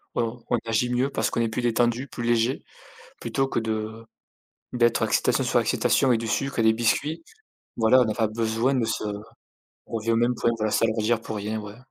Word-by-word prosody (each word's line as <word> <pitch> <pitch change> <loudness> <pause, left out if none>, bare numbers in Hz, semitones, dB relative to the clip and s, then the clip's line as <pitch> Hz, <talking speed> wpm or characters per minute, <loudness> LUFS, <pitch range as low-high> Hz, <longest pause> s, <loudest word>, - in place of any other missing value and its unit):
on 115 0 -2
on 120 - +2
agit 115 +2 0
mieux 130 +3 +1
parce - - -1
qu'on - - -2
est 115 - +2
plus 115 +3 -3
détendu, 120 +2 +1
plus 120 - -6
léger 120 +2 +1 0.6
plutôt 135 0 -1
que 120 - -1
de 110 0 -4 0.7
d'être 120 -1 +2
excitation - - +1
sur - - +2
excitation 130 - +2
et 120 - +3
du 115 0 -4
sucre 135 +1 -1
et - - +3
des 110 0 +5
biscuits. 120 +8 0 0.5
Voilà, 115 +3 +5
on 120 - +2
a - - -2
pas 110 - +1
besoin 115 +4 0
de 125 -3 +1
se 110 - -2 0.8
on - - -17
revient 115 +1 -1
au - - +2
même 120 +2 +2
point, 115 - +1
voilà, 110 -1 -1
s'alourdir 110 0 +1
pour 110 -1 -6
rien, 105 +2 -3
ouais. 105 0 -9
115 Hz, 205 wpm, -25 LUFS, 110-120 Hz, 0.8 s, des